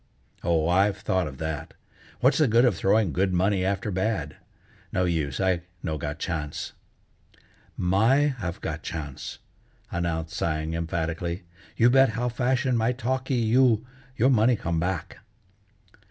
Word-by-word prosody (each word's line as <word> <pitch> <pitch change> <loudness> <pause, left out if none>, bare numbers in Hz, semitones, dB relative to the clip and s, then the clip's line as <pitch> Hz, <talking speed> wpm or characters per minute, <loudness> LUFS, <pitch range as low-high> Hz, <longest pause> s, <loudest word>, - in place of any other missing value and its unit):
"Oh, 85 -2 +2
I've 95 +3 +3
thought 95 -3 0
of 65 -3 -8
that. 80 -1 -5 0.5
What's 130 +5 +4
the 155 - +5
good 115 +2 +5
of 125 - +3
throwing 100 -4 +2
good 95 +3 +1
money 95 +1 +2
after 100 +2 -1
bad? 95 -4 -1 0.6
No 90 - +1
use, 80 -6 -1
I 95 -2 +1 0.2
no 80 -1 -2
got 75 +1 -4
chance." 75 -3 -4 1.0
"My 115 +11 +3
have 85 -5 -4
got 80 0 -4
chance," 75 -5 -6 0.5
announced 85 -1 -2
Tsang 80 0 -1
emphatically, 85 +2 -2 0.3
"you 120 +2 +5
bet 135 0 +6
how 125 +1 0
fashion 125 +1 +1
my 115 +2 +2
talkee 130 +2 -1
you, 120 0 +4 0.3
your 130 +5 +4
money 120 0 +4
come 85 -5 -2
back." 90 +3 -3
95 Hz, 140 wpm, -26 LUFS, 80-115 Hz, 1.0 s, bet